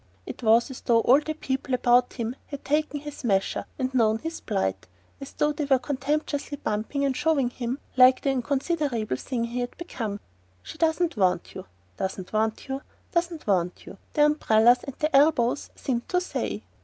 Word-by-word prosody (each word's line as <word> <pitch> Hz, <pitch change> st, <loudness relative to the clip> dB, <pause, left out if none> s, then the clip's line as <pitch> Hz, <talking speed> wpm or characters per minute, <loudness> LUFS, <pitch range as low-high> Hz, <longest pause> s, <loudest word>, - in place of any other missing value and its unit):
It -, -, -8 dB
was 230 Hz, +3 st, +4 dB
as 260 Hz, -, -9 dB
though 230 Hz, -2 st, +3 dB
all 260 Hz, +5 st, +6 dB
the 310 Hz, +1 st, -4 dB
people 265 Hz, -3 st, -2 dB
about 245 Hz, 0 st, +3 dB
him 235 Hz, 0 st, -3 dB
had 280 Hz, -2 st, -8 dB
taken 300 Hz, 0 st, 0 dB
his 295 Hz, -1 st, -8 dB
measure 195 Hz, -5 st, 0 dB
and 260 Hz, -1 st, -2 dB
known 220 Hz, -3 st, +3 dB
his 325 Hz, +7 st, -6 dB
plight; 95 Hz, +2 st, -2 dB, 0.3 s
as 275 Hz, -, -9 dB
though 295 Hz, -, +1 dB
they 295 Hz, 0 st, -3 dB
were 270 Hz, -1 st, +4 dB
contemptuously 285 Hz, +2 st, -2 dB
bumping 225 Hz, +6 st, -2 dB
and 270 Hz, -2 st, 0 dB
shoving 295 Hz, -4 st, +1 dB
him 245 Hz, +1 st, -3 dB, 0.2 s
like 255 Hz, 0 st, +6 dB
the 275 Hz, -, +1 dB
inconsiderable 265 Hz, -, -1 dB
thing 245 Hz, -, -3 dB
he 235 Hz, +1 st, -3 dB
had 245 Hz, 0 st, -4 dB
become. 225 Hz, -12 st, -5 dB, 0.4 s
"She -, -, -10 dB
doesn't 325 Hz, -2 st, +1 dB
want 185 Hz, -3 st, +1 dB
you, -, -, -8 dB, 0.3 s
doesn't 190 Hz, 0 st, -4 dB
want 220 Hz, +3 st, 0 dB
you, 270 Hz, 0 st, -3 dB, 0.3 s
doesn't 340 Hz, -2 st, -1 dB
want 180 Hz, -3 st, 0 dB
you," -, -, -11 dB
their 295 Hz, -, +5 dB
umbrellas 245 Hz, -5 st, +4 dB
and 275 Hz, -, -7 dB
their 305 Hz, -1 st, 0 dB
elbows 275 Hz, -3 st, +3 dB
seemed 240 Hz, -3 st, -3 dB
to 360 Hz, -, +2 dB
say. 360 Hz, -, -4 dB
260 Hz, 180 wpm, -26 LUFS, 230-295 Hz, 0.4 s, all